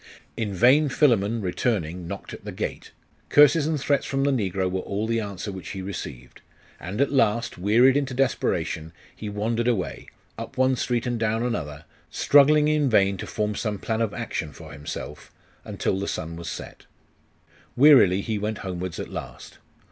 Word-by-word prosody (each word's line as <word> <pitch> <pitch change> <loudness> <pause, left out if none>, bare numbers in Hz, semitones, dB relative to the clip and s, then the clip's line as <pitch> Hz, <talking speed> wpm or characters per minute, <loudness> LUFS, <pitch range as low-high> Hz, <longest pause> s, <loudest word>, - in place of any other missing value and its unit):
In 110 -3 -2
vain 130 - +4
Philammon, 115 -6 +2
returning, 90 -3 -2
knocked - - -7
at - - -10
the - - -6
gate. - - -5 0.4
Curses 150 +1 +6
and 155 -2 0
threats 140 +1 +1
from 135 0 -1
the 140 - +2
negro 95 -7 0
were 95 +1 -2
all 100 +3 -3
the 115 0 0
answer 100 -1 -5
which 95 -1 -8
he 95 -1 -6
received; 65 -10 -8 0.4
and 95 +6 -6
at 140 0 +2
last, 115 -6 +1
wearied 115 +8 +4
into 135 -3 -1
desperation, 85 -10 -1 0.2
he 105 - -6
wandered 115 +3 -1
away, 110 -7 -2 0.3
up - - -8
one 130 0 +3
street 120 -1 -1
and 120 -2 -2
down 110 +1 0
another, 75 -12 -4 0.2
struggling 150 +1 +5
in 150 -2 +2
vain 100 -3 +3
to - - -6
form 105 -1 -2
some 105 0 -3
plan 110 +3 -2
of 115 -3 0
action 75 - -4
for - - -12
himself, 75 +1 -8 0.3
until 95 - -2
the 100 - -3
sun 80 +1 -4
was 85 0 -6
set. - - -9 0.9
Wearily 125 -9 +6
he 110 0 -3
went 105 0 -4
homewards 90 -2 -4
at - - -5
last. - - -8
110 Hz, 175 wpm, -25 LUFS, 95-130 Hz, 0.9 s, Curses